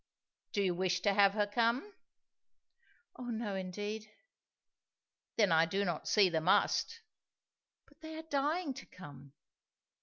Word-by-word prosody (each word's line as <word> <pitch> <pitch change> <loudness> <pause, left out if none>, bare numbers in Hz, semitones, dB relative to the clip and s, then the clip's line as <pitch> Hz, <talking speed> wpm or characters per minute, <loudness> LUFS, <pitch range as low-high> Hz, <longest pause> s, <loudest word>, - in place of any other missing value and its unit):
"Do 205 - +1
you 185 -2 +1
wish 180 0 0
to 205 - +2
have 200 0 +5
her 210 -1 +2
come?" 235 - 0 1.2
"Oh 250 - -7
no, 225 -3 -3
indeed!" 205 +3 -5 1.3
"Then 205 -5 +3
I 165 0 +4
do 195 +4 0
not 175 - -3
see 205 -3 +5
the 165 -3 0
'must.'" 455 - +2 0.8
"But 290 +2 -26
they 315 0 -8
are 320 - -7
dying 300 +1 -1
to 270 - -11
come." 140 -5 -13
205 Hz, 140 wpm, -33 LUFS, 185-260 Hz, 1.3 s, have